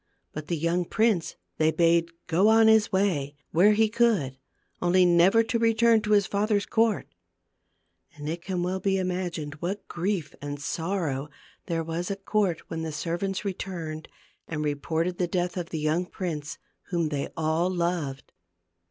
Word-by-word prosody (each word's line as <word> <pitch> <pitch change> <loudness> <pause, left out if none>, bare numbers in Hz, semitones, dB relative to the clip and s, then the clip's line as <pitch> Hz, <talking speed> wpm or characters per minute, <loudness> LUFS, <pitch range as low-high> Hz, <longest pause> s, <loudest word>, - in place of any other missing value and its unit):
But 155 0 -6
the 170 - -1
young 170 +3 0
prince 215 -4 +1 0.2
they 155 0 +4
bade 170 0 +3 0.2
go 180 +5 +3
On 225 0 +6
his 220 -1 +5
way, 175 -8 0 0.2
where 195 +6 +5
he 220 0 +2
would; 180 - +2 0.4
only 180 +1 +4
never 180 +6 +5
to 230 +1 -1
return 230 0 +4
to 210 0 0
his 205 -1 +4
father's 205 0 0
court. 225 -1 +1 1.0
And 145 0 -7
it 165 +2 -3
can 180 0 -2
well 185 +1 -1
be 195 0 +1
imagined 180 -5 -3
what 195 +4 -4
grief 175 -4 -2
and 145 0 -5
sorrow 155 -3 -2 0.4
there 165 -2 -1
was 165 +3 -3
at 195 -1 -5
court 200 -6 +1
when 160 - -4
the 160 -1 -3
servants 175 +6 -3
returned 170 -5 -5 0.4
and 150 -2 -3
reported 160 +4 -1
the 180 - +1
death 175 0 -1
of 175 -2 -4
the 160 - -4
young 155 +4 0
prince, 160 -4 -5 0.3
whom 170 -3 0
they 145 -2 -2
all 160 +3 +1
loved. 170 -6 -2
175 Hz, 160 wpm, -27 LUFS, 160-195 Hz, 1.0 s, On